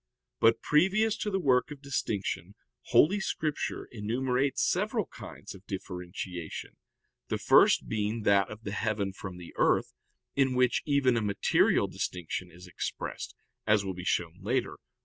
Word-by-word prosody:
But 115 0 +4
previous 200 +8 +3
to 210 - -2
the 195 - 0
work 130 -7 +3
of 150 -2 -8
distinction 100 - -2 0.3
Holy 155 +12 +4
Scripture 155 -5 -2
enumerates 125 +5 0
several - - 0
kinds - - -10
of 95 - -14
differentiation, 90 -2 -6 0.5
the - - -1
first - - +5
being 110 +1 -1
that 100 -1 +4
of 110 +1 -9
the 100 - -4
heaven 105 -2 -1
from 95 -2 -8
the 90 -2 -10
earth, - - +2 0.4
in 135 -2 +2
which 125 -1 +3
even 140 -4 +3
a - - +1
material 100 -2 +3
distinction 90 0 -4
is 90 +2 -13
expressed, 90 - -5 0.3
as 105 -2 +4
will 95 - -2
be 90 0 -7
shown 90 0 -1
later - - 0
(A. - - -14
110 Hz, 150 wpm, -29 LUFS, 95-135 Hz, 0.5 s, first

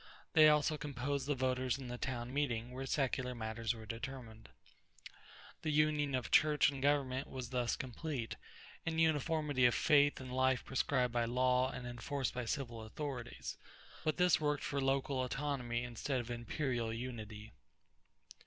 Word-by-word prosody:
They 155 -1 +8
also 150 0 +3
composed 140 0 -2
the 145 - +1
voters 130 -1 0
in 135 -2 -7
the 125 0 -5
town 125 -1 -3
meeting, 125 -5 -1
where 135 +1 -5
secular 130 -3 0
matters 110 0 -2
were 110 -1 -9
determined. 115 -1 -7 1.1
The 155 - -2
union 150 -2 +2
of 125 - -3
church 150 -2 +5
and 135 -1 -6
government 135 -2 +1
was 130 -2 -6
thus 125 -2 +1
complete, 130 -1 -4 0.5
and 165 0 -1
uniformity 150 -4 +3
of 120 - +1
faith 145 -1 +4
and 130 -1 -7
life 130 0 +2
prescribed 125 -2 +1
by 120 -1 +2
law 125 +1 +2
and 125 -1 -6
enforced 125 +3 -3
by 125 -1 -3
civil 120 -2 -3
authorities; 120 - -5 0.4
but 155 - 0
this 180 -3 +4
worked 150 -1 0
for 140 -1 -1
local 135 0 +1
autonomy 125 -3 -2
instead 125 +3 -2
of 120 0 -5
imperial 120 -1 -2
unity. 110 -2 -6
130 Hz, 155 wpm, -36 LUFS, 120-145 Hz, 1.1 s, They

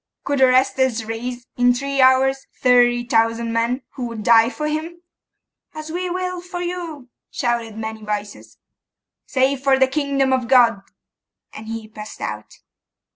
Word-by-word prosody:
Could 280 -1 -1
Orestes 260 -2 +3
raise, 240 +2 -5
in 245 0 +4
three 275 +1 -1
hours, 265 +1 +3
thirty 245 -1 +4
thousand 230 0 +1
men, 235 +3 0
who 250 -2 -5
would 230 -2 -7
die 230 +1 +5
for 300 +4 -4
him?' 325 +3 -4 0.7
'As 310 0 -7
we 360 +2 -3
will 365 0 -3
for 355 0 -7
you!' 345 -7 -5 0.2
shouted 235 -3 -2
many 220 0 -6
voices. 210 -1 -6 0.7
'Say 265 +1 +2
for 270 0 +2
the 265 - +5
kingdom 275 -1 0
of 255 -2 0
God.' 235 -5 +4 0.7
And 220 +1 -10
he 225 -1 -6
passed 215 0 -10
out. 105 0 -7
255 Hz, 145 wpm, -20 LUFS, 230-280 Hz, 0.7 s, die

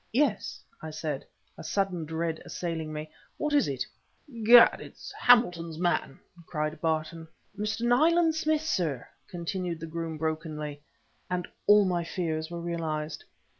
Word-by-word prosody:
"Yes!" 250 -5 0 0.2
I 160 - -6
said, 155 -3 -4 0.3
a - - -7
sudden 190 -5 -1
dread 160 +1 -2
assailing 165 -3 -4
me. 155 0 -6 0.3
"What 300 0 -1
is 290 - +4
it?" 130 -2 -2 0.6
"Gad! 235 +2 +8
it's - - -10
Hamilton's 175 -10 +4
man!" 175 -5 0 0.3
cried 155 -1 -3
Barton. 160 0 -1 0.3
"Mr. 215 +2 -2
Nayland 320 +8 +4
Smith, 310 -1 +1
sir," 160 - -1 0.2
continued 175 -1 -3
the 165 - -5
groom 165 0 -4
brokenly 155 -2 -3 0.5
and 180 -1 -2 0.2
all 205 0 +7
my 175 -2 0
fears 160 -2 -2
were 170 0 -5
realized. 160 -3 -3
170 Hz, 135 wpm, -28 LUFS, 155-205 Hz, 0.6 s, Gad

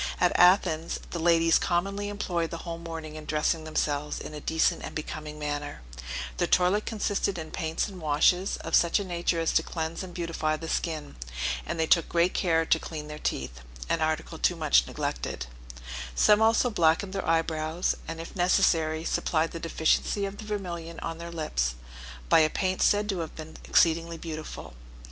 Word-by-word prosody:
At 180 - +4
Athens, 175 -3 +4
the 170 - -3
ladies 165 0 +4
commonly 195 +4 -1
employ 175 -5 -1
the 170 +2 -7
whole 170 -1 -5
morning 165 -2 -7
in 155 -1 -8
dressing 155 +1 0
themselves 150 -1 -1
in - - -8
a 150 - -7
decent 160 +2 +1
and - - -7
becoming 155 0 -5
manner; 145 - -4 0.5
their - - +1
toilet 185 +4 +3
consisted 205 -3 -1
in 160 -1 -6
paints 160 -2 -1
and 190 -4 -10
washes, 160 +5 +2
of - - -7
such 170 +4 +4
a - - -2
nature 175 -2 -1
as 165 - +1
to - - +4
cleanse 160 0 -4
and 180 -2 -8
beautify 165 -3 -1
the 165 - -7
skin, 155 - -3 0.5
and 170 - -3
they 160 - +3
took 165 0 +3
great 170 +1 +2
care 165 -2 +2
to 160 - +3
clean 150 -2 -7
their 150 0 -7
teeth, 65 - -3 0.3
an 165 - +1
article 155 -1 -1
too - - +2
much - - +3
neglected: - - -3 0.7
some 210 - +5
also 225 +2 +4
blackened 175 +1 +2
their 195 - -3
eyebrows, 165 +1 +1
and, 165 0 -5
if 165 - -8
necessary, 165 -3 +2
supplied 160 0 0
the 165 - -6
deficiency 165 +5 +1
of 195 +1 -6
the 215 - -7
vermillion 175 -5 -5
on 165 0 -4
their 170 0 -7
lips, 65 - -1 0.5
by - - +6
a 155 -1 +4
paint 185 +2 -1
said 205 0 +3
to 195 -4 -1
have 165 -2 -5
been 160 0 -9
exceedingly 165 0 +3
beautiful. 155 - -7
165 Hz, 180 wpm, -28 LUFS, 155-180 Hz, 0.7 s, by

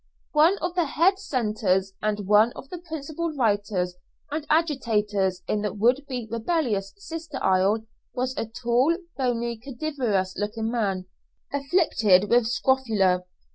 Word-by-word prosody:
One 320 +6 +5
of 350 0 -1
the 355 -2 +1
head 360 +7 +2
centres, 210 - 0
and 210 -1 -1
one 210 +4 +5
of 270 - -10
the 360 - -6
principal 320 0 -4
writers 205 -7 0 0.3
and 305 0 -3
agitators 210 - +1
in 210 - 0
the 210 - -1
would 250 +7 +1
be 250 -4 -4
rebellious 230 - -1
sister 325 -6 -7
isle 195 +4 +2 0.3
was 255 +1 -2
a 225 - -2
tall, 240 +7 +1 0.2
bony, 235 -3 -1
cadaverous 240 -7 -2
looking 220 +2 -2
man, 195 -6 -1 0.5
afflicted 275 - +3
with 240 -1 +4
scrofula. 220 -8 +2
235 Hz, 135 wpm, -25 LUFS, 205-290 Hz, 0.5 s, One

